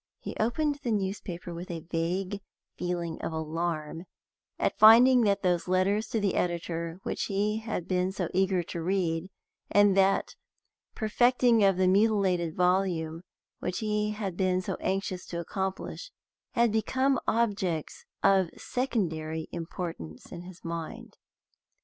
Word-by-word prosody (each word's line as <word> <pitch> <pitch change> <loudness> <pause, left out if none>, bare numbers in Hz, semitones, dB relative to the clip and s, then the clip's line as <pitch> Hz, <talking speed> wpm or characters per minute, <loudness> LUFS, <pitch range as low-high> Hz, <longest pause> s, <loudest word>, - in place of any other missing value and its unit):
He - - -7
opened 285 +6 0
the 245 - -3
newspaper 190 -4 -3
with 170 +2 -7
a 170 -2 -4
vague 185 +4 -1 0.3
feeling 175 -2 -3
of - - -3
alarm 160 +1 -3 0.5
at - - -1
finding 245 +4 +8
that 200 -1 +1
those 180 -1 +1
letters 195 +4 +2
to 225 - -1
the 200 -3 +1
editor 170 -1 -2
which - - -2
he 210 +2 0
had 220 -6 -4
been 185 0 +1
so 190 -3 -2
eager 190 -1 +2
to 170 0 -6
read, 175 -1 -1 0.4
and 205 -1 +5
that 195 0 +2 0.6
perfecting 240 +1 +3
of 195 -2 +4
the 185 0 +3
mutilated 190 -4 +2
volume 180 -3 +1 0.4
which 180 - -3
he 210 -1 0
had 210 -4 -4
been 185 -1 +1
so - - -2
anxious 190 -1 -2
to 170 - -4
accomplish, 190 - -4 0.4
had 235 -1 +3
become 260 +5 +1
objects 200 -8 -1 0.2
of 190 -3 +4
secondary 160 -11 -2
importance 165 - -6
in 170 - -7
his 180 -1 -12
mind. 165 -1 -6
185 Hz, 135 wpm, -28 LUFS, 170-210 Hz, 0.6 s, finding